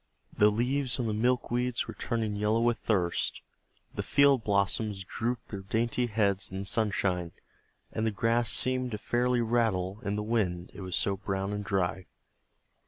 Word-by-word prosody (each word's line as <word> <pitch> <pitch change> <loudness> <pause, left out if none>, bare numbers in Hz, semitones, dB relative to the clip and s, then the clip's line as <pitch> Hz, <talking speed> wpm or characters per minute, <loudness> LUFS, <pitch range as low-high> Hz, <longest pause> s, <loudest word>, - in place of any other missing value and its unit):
The 105 - +6
leaves 125 +5 0
on 120 - 0
the 110 - 0
milkweeds 125 +1 0
were - - -6
turning 110 -3 -2
yellow 105 +2 +1
with 120 0 +2
thirst, 90 -6 0 0.5
the - - -2
field 140 -4 +4
blossoms 100 0 0
drooped 115 +5 -3
their 100 - -5
dainty 115 +5 0
heads 105 -3 +1
in 95 +1 -4
the - - -6
sunshine, 95 -5 0 0.6
and 110 - -2
the 110 - +2
grass 115 +3 +1
seemed 130 0 +1
to - - -1
fairly 120 +3 +1
rattle 110 -5 0
in 100 - -1
the 105 - -2
wind, 95 -6 -1
it - - -9
was 95 -1 -3
so 100 -1 +1
brown 95 0 -2
and 105 0 -3
dry. 95 -2 -1
110 Hz, 170 wpm, -29 LUFS, 100-120 Hz, 0.6 s, The